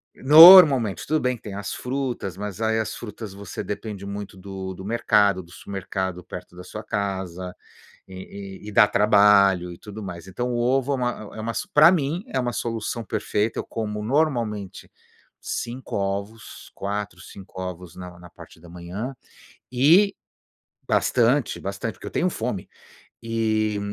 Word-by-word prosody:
Normalmente, 150 - +8
tudo 155 +1 +1
bem 125 -2 0
que - - -30
tem 105 - -7
as 100 0 -5
frutas, 125 -8 -4
mas 100 +1 -6
aí 110 0 +1
as 110 - -3
frutas 110 -2 -8
você 100 +1 -7
depende 105 -1 -6
muito 100 0 -7
do 95 0 -7
do 95 - -10
mercado, 105 -3 +2
do 85 - -19
supermercado, 95 -2 -5
perto 90 +1 -10
da 90 - -10
sua 105 +4 -8
casa, 95 -4 -4 0.5
e 95 +1 -9
e 105 - -8
e - - -7
dá 105 +1 +6
trabalho 100 -4 +4
e 85 - -12
tudo 105 +1 -9
mais. 90 -1 -8
Então 120 +6 -3
o 120 - -1
ovo 130 +3 +1
é - - +1
uma 125 -1 0 0.3
é 110 - -6
uma 115 +1 -3 0.2
para 155 +3 +8
mim 165 0 -1
é - - -2
uma 125 -1 -1
solução 115 0 -3
perfeita. 105 0 -2
Eu - - -2
como 105 -2 -4
normalmente 115 - -1 0.5
5 125 +2 -5
ovos, 100 +3 -5
4, 100 -2 -4
5 95 +1 -11
ovos 90 -2 -7
na 90 -1 -9
na 90 0 -14
parte 80 - -15
da 85 - -14
manhã, 90 +9 -6 0.6
e 165 +11 +4 0.7
bastante 125 +2 +2
bastante, 100 +2 -5
porque - - -12
eu - - -5
tenho 180 - 0
fome, 115 - -4 0.5
e 110 -2 0
105 Hz, 165 wpm, -23 LUFS, 95-120 Hz, 0.7 s, Normalmente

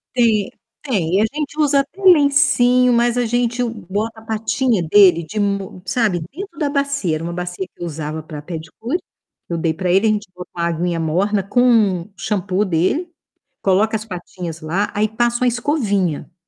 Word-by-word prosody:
Tem 220 -5 +2 0.3
tem, 185 - 0
e 205 - +4
a - - +4
gente 300 0 -4
usa 285 -2 +4
até 365 +8 -4
lencinho, 280 -7 +5
mas 240 0 +2
a 245 - +1
gente 240 +1 0
bota 220 0 -4
a - - -15
patinha 220 -1 0
dele 175 -1 +5
de 210 +7 -5
mo 200 -2 -2
sabe, 195 -2 +1
dentro 345 +1 -9
da 290 -2 0
bacia. 280 - 0
Era 160 - -5
uma 170 - -3
bacia 180 +2 -4
que 180 - -22
eu - - -2
usava 155 -1 -5
para 150 -1 -8
pedicure, 175 - -5 0.5
eu 170 - -3
dei 160 -1 0
para 180 +3 -3
ele. 195 +5 +4
A - - +4
gente 210 -1 -1
bota 180 - -9
uma 170 -1 -2
aguinha 170 0 -1
morna 190 +6 +1
com 215 -4 +3
o 195 - -13
shampoo 200 0 -1
dele, 190 - 0 0.5
coloca 205 +3 +2
as 215 - -2
patinhas 175 -3 -7
lá, 180 +7 -1
aí 215 +1 +1
passa 240 +2 0
uma - - +4
escovinha. 215 - -1
210 Hz, 185 wpm, -19 LUFS, 175-245 Hz, 0.5 s, lencinho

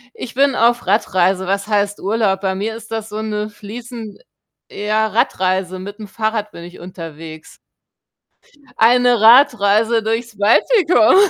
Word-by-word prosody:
Ich 240 - -8
bin 275 +1 +2
auf 240 +1 +1
Radreise. 190 -2 +1
Was 200 +2 -2
heißt 205 -1 -1
Urlaub? 200 -2 0
Bei 190 -1 -1
mir 210 +4 -4
ist 225 0 -12
das 225 -1 -5
so 210 0 -6
'ne 210 -1 -4
fließend 225 - -10 0.5
ja, 215 +1 -1
Radreise, 185 -3 -1
mit'm 205 +3 -9
Fahrrad 215 +1 -3
bin 170 - -12
ich 175 +1 -12
unterwegs. 165 -3 -10 1.2
Eine 245 +1 +4
Radreise 225 -2 +4
durchs 225 +1 -3
Baltikum. 245 - +3
215 Hz, 135 wpm, -18 LUFS, 195-230 Hz, 1.2 s, Eine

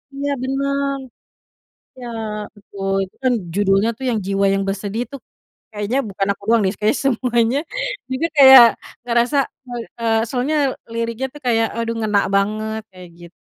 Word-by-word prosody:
Iya 285 +1 -2
benar, 275 +1 -1 1.0
ya 245 - -7 0.5
betul. 195 -1 -6
Itu 190 - -11
kan 255 -1 +3 0.2
judulnya 195 +2 +2
tuh 265 - -6
yang 225 -3 0
Jiwa 195 0 +1
yang 195 0 0
Bersedih. 205 +3 -3
Itu 275 - -9 0.6
kayaknya 210 +4 -2
bukan 195 0 -2
aku 200 - -22
doang 230 -1 +4
nih, 190 0 +1
kayaknya 215 +6 +1
semuanya 240 0 +1 0.5
juga 260 +6 0
kayak 265 -3 +10 0.4
ngerasa. 240 +4 +1 0.3
Eee 240 -1 -5 0.2
eee, 225 -1 +2
soalnya 260 +5 -1 0.4
liriknya 230 +2 -2
tuh 295 - -12
kayak 225 -1 +3
aduh 230 0 -2
ngena 210 -2 +1
banget, 215 +2 -1
kayak 185 -1 -12
git 170 0 -13
230 Hz, 150 wpm, -20 LUFS, 200-260 Hz, 1.0 s, kayak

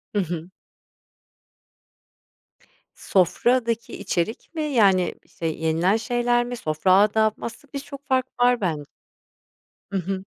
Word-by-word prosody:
Hı - - +3
hı. 170 0 -5 2.5
Sofradaki 230 +5 +1
içerik 200 - -3
mi, 315 - -1
yani, 200 - +3
işte, 165 - -9
yenilen 160 +4 +1
şeyler 240 +1 +1
mi, 245 0 -4
sofra 155 0 +1
adabı 215 +2 +3
mı? - - -6
Aslında 255 +5 -9
biz 280 -1 -4
çok 280 -1 -10
fark 260 -2 +2
var 245 -1 +4
ben 160 -6 -1 1.1
I - - -4
hı. 190 +1 -3
215 Hz, 120 wpm, -24 LUFS, 180-245 Hz, 2.5 s, var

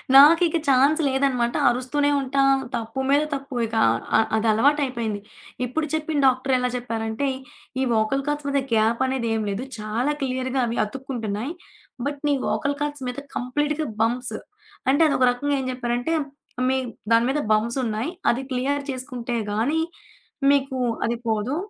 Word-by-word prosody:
నాకిక 325 +4 +7
chance 275 +4 +4
లేదనమాట, 265 -3 +1 0.2
అరుస్తూనే 260 +4 0
ఉంటా, 275 0 0 0.3
తప్పు 230 +4 -4
మీద 285 +1 +5
తప్పు. 275 -1 -5
ఇకా 225 0 0 0.4
అ - - +5 0.2
అదలవాటయిపోయింది. 230 -1 +1 0.5
ఇప్పుడు 300 +6 -1
చెప్పిన 310 -1 -1
డాక్టరెలా 255 -1 +2
చెప్పారంటే, 230 +1 -2 0.5
ఈ - - +2 0.2
ఓకల్ 270 +6 0
కార్ట్స్ 295 -1 -2
మీద 280 - +2
గ్యాపనేది 235 +3 +1
ఏమి 220 -1 -1
లేదు, 200 +5 -3 0.2
చాలా 225 +7 -1
క్లియర్‌గా 260 0 -1
అవి 235 - -3
అతుక్కుంటున్నాయి, 235 +1 -4 0.5
బట్ 285 0 -4
నీ - - +4 0.2
ఓకల్ 285 -1 -1
కార్ట్స్ 290 -2 -3
మీద 250 - -6 0.2
కంప్లీట్‌గా 295 +4 -1
బంప్స్ 245 +3 0 0.6
అంటే, 285 - +3
అదొక 260 -3 +3
రకంగా 285 +4 -1
ఏం 265 - -3
జెప్పారంటే, 245 +4 -1 0.6
మీ 265 - +2 0.4
దాని 230 +1 +5
మీద 295 - 0
బంప్సున్నాయి. 230 +4 0 0.2
అది 250 +3 -2
క్లియర్ 280 +3 0
చేసుకుంటే 250 -2 -4
గానీ, 250 +10 +1 0.7
మీకు 275 -2 +1 0.3
అది 235 +1 -1
పోదు. 220 +5 0
255 Hz, 135 wpm, -24 LUFS, 235-280 Hz, 0.7 s, నాకిక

